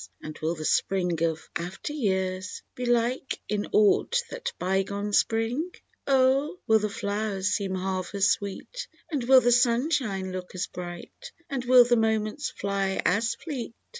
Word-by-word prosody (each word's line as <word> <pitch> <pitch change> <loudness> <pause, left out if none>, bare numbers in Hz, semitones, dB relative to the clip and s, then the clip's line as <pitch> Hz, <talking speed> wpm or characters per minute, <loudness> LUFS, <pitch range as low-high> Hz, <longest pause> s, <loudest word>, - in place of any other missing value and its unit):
And 155 0 -7
will 160 +2 -1
the 155 -1 -6
Spring 180 -3 +1
of 160 -1 -1
after 180 - -4
years 190 -7 -2
Be 250 -1 -4
like 240 +2 0
in 210 -1 -1
aught 215 - +4
that - - -4
bygone 195 +2 -1
Spring? 230 - +1 0.4
Oh! 275 +4 +3
will 220 0 +5
the 210 0 -1
flow'rs 205 -1 -2
seem 195 -3 -1
half 185 0 -3
as 195 -1 +3
sweet. 205 - -4 0.2
And 285 -5 -1
will 260 +1 +7
the 245 - +3
sunshine 240 - +2
look 185 0 -7
as 185 - -1
bright, 180 - -9 0.2
And 265 -3 -2
will 250 0 +8
the 240 0 +3
moments 220 +4 0
fly 195 -1 -2
as 220 +5 +2
fleet. 275 -4 -6
210 Hz, 155 wpm, -27 LUFS, 190-250 Hz, 0.4 s, will